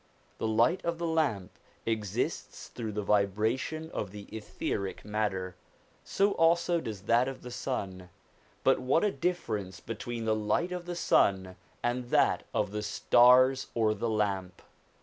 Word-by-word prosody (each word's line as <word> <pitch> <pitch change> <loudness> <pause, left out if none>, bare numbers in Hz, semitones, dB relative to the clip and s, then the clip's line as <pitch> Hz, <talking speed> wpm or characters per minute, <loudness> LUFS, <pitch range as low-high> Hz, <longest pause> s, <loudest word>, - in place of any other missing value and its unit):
The - - -1
light 115 +11 +2
of 170 0 -1
the 170 - -3
lamp 155 - -1 0.3
exists 110 -4 -3
through 110 -3 -5
the 105 0 -2
vibration 110 - 0
of 100 - -3
the 100 +1 -9
etheric 100 -2 -4
matter, 100 -4 -2 0.5
so 200 +1 +1
also 170 0 +2
does 105 -7 -6
that 115 +5 +3
of 135 -1 -6
the 125 - -8
sun; 95 -8 -4 0.5
but - - +4
what 130 +8 +2
a 210 - +2
differ 175 - -1
ence 95 -2 -9
between 115 +3 -5
the 110 - +2
light 110 +11 0
of 180 -1 -5
the 175 - -3
sun 95 - +2 0.3
and 120 +1 -1
that 120 - +2
of - - -1
the 105 0 -3
stars 130 +5 +5
or 110 -2 +2
the 110 +3 -2
lamp 100 -4 -2
110 Hz, 155 wpm, -30 LUFS, 105-135 Hz, 0.5 s, stars